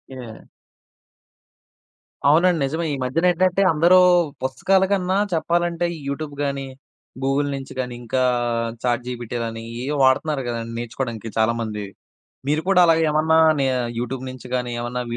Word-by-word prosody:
Okay. 120 -4 -10 1.8
అవునండి. 165 +4 +4
నిజమే. 160 +5 -2
ఈ - - -1
మధ్య 130 +5 -1
నేంటంటే 180 +2 +2
అందరూ 170 +4 +5 0.5
పుస్తకాల 185 +9 +2
కన్నా 190 -1 +1 0.2
చెప్పాలంటే 170 +1 0 0.2
యూట్యూబ్ 145 +1 -4
గానీ, 140 -1 -2 0.6
గూగుల్ 140 +1 +1
నుంచి 135 -1 -8
గానీ, 125 -1 -3
ఇంకా 130 +2 0 0.6
చాట్ 120 0 0
జీపీటీ 120 -1 -5
గానీ 115 0 -6 0.2
ఏయో 140 +4 -2
వాడుతున్నారు 135 +2 +2
కదండీ 115 -1 -4
నేర్చుకోవడానికి 120 -2 -5
చాలామంది. 110 -2 0 0.6
మీరు 155 +2 +1
కూడా 195 -2 +5
అలాగ 165 -1 +4
ఏమన్నా 160 +1 +3 0.2
నే 135 - +2 0.3
యూట్యూబ్ 125 +2 -4
నుంచి 130 -1 -10
గానీ, 125 -1 -3
ఏమన్నా 125 +1 -3
135 Hz, 130 wpm, -22 LUFS, 120-165 Hz, 1.8 s, అందరూ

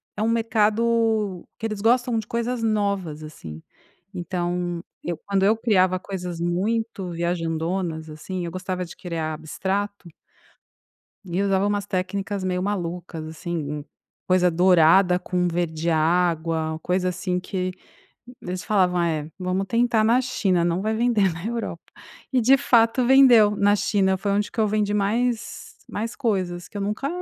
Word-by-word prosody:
é - - -4
um 220 - +2
mercado 225 -3 +1
que 225 - -5
eles 215 -2 -3
gostam 240 +1 +2
de 220 - -2
coisas 235 0 -2
novas, 200 -8 -1
assim. 80 - -9 0.5
Então, 175 -1 -2 0.2
eu, 170 -1 -3
quando 195 -1 +1
eu 215 +3 +4
criava 185 -5 +2
coisas 180 -3 -6
muito 195 +3 -1
viajandonas, 165 -1 -2
assim, 175 +4 -5
eu 170 - -5
gostava 185 0 -4
de 170 - -11
criar 165 -3 -4
abstrato 190 +5 -3 1.2
e 180 +1 -1
usava 195 -1 +2
umas 205 -1 -1
técnicas 195 +1 -3
meio 180 -1 -1
malucas, 175 -4 -4
assim, 165 +2 -5
hum, 150 -1 -4 0.4
coisa 180 -1 +3
dourada 180 +1 +5
com 180 -1 -1
verde 170 -1 -1
água, 160 -1 +1
coisa 185 0 +1
assim 180 0 -2
que 185 0 -3 0.7
eles 180 +1 -5
falavam: 185 -4 +2
"É, 155 -3 -1
vamos 185 +1 -1
tentar 230 +1 +2
na 230 +3 +4
China, 195 -9 +1
não 175 +2 0
vai 220 +2 -1
vender 220 -5 +2
na 165 +3 -7
Europa." 235 0 -4 0.5
E, 255 - +3
de 260 +4 +6
fato, 240 -2 +3
vendeu 245 -5 +6
na 205 0 +3
China. 200 -2 +1
Foi 200 +1 -2
onde 205 +1 0
que - - -6
eu 215 - +3
vendi 210 0 0
mais 225 +3 -1
mais 225 +2 -4
coisas 180 -6 -2
que - - -29
eu - - -3
nunca 210 +7 -2
190 Hz, 150 wpm, -24 LUFS, 175-215 Hz, 1.2 s, de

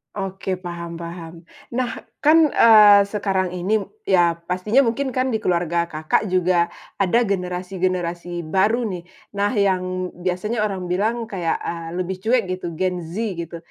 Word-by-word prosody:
Oke, 195 -1 -3
paham-paham. 170 -1 -7 0.3
Nah, 245 -1 -2 0.2
kan, 310 0 +5
eee, 210 -3 +8
sekarang 195 -3 -1
ini 190 +4 0 0.2
ya, 170 - +3
pastinya 210 +9 +2
mungkin 265 +4 -1
kan 255 -1 -1
di 220 - -1
keluarga 170 -1 0
Kakak 155 +6 0
juga 180 -1 +2 0.3
ada 195 +5 +3
generasi-generasi 180 -2 -2
baru, 210 +8 +1
nih. 175 - -5 0.3
Nah, 200 +1 +1
yang 185 -2 0
biasanya 185 +5 -2
orang 195 -4 -2
bilang 215 +6 -1
kayak, 185 -6 -2
eee, 165 -1 -5
lebih 185 +1 -3
cuek 230 -1 +2
gitu 180 -3 -5
Gen 180 0 -1
Z, 165 +1 -9 0.3
gitu. 170 0 -7
185 Hz, 140 wpm, -22 LUFS, 175-210 Hz, 0.3 s, eee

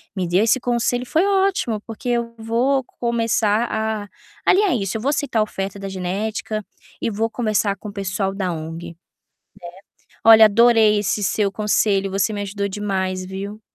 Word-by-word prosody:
me 185 -2 -2
deu, 180 +5 +2
esse 230 +4 +3
conselho 245 +1 0
foi 325 +8 +1
ótimo, 385 - +1
porque 225 +2 -6
eu 235 -1 -1
vou 245 +4 0 0.2
começar 230 -2 +1
a 220 -1 -2 0.4
alinhar 390 -4 +4
isso. 195 0 -2
Eu - - -7
vou 275 - 0
aceitar 285 -6 0
a - - +4
oferta 195 -1 -5
da 195 - -5
genética 205 +3 -3 0.4
e - - 0
vou 225 +2 -1
conversar 215 -4 0
com 210 - -8
o - - -10
pessoal 195 0 -2
da 185 -3 -2
ONG, 165 +1 -6
né. 165 - -13 1.3
Olha, 225 -1 +9
adorei 220 -1 +5
esse 205 +1 -1
seu 200 +2 +1
conselho, 200 -1 +1
você 195 +3 0
me 205 -1 -3
ajudou 200 0 -3
demais, 190 -2 -2
viu. 200 +3 -7
215 Hz, 170 wpm, -21 LUFS, 195-230 Hz, 1.3 s, Olha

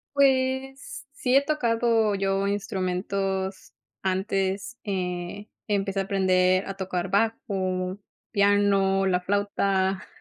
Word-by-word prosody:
Pues, 265 0 +1
sí 260 -3 0
he 275 - +8
tocado 230 -7 +1
yo 195 0 0
instrumentos 195 -1 -2 0.3
antes. 195 +3 -1
Eh, 185 +1 -4 0.2
empecé 195 -1 0
a - - +2
aprender 185 -1 +2
a 195 - -4
tocar 185 -1 -3
bajo, 190 -3 -1 0.3
piano, 200 -2 +3
la 180 -1 +2
flauta 195 0 0
195 Hz, 100 wpm, -26 LUFS, 190-215 Hz, 0.3 s, he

